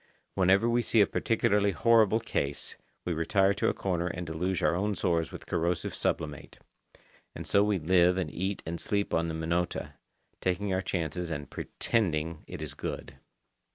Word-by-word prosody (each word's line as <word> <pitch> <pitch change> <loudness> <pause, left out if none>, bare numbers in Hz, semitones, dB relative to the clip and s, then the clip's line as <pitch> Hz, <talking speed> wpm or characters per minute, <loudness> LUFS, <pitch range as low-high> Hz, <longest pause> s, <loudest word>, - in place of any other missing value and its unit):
Whenever 95 +4 +4
we 120 +1 +3
see 115 - +2
a 100 - +7
particularly 105 -2 +1
horrible 110 +3 +4
case, 70 -10 -2 0.3
we 90 - 0
retire 95 +5 +2
to - - +1
a - - 0
corner 90 -2 -1
and 90 0 -4
deluge 85 +3 -2
our 75 - +4
own 100 +4 0
sores 85 -3 0
with - - -9
corrosive 85 +1 -1
sublimate. 75 -3 -3 0.8
And - - -6
so 100 - +4
we 105 -1 +2
live 90 +2 +4
and 95 - -2
eat 95 +2 -2
and 85 +1 -4
sleep 100 -1 -1
on 85 0 +2
the 80 - -3
Minota, 85 +2 -2 0.5
taking 95 +2 -1
our 95 - +1
chance 85 -4 -2
and 80 -5 -4
"pretending 85 -7 -1
it - - -6
is - - -5
good." - - -6
90 Hz, 170 wpm, -29 LUFS, 85-100 Hz, 0.8 s, a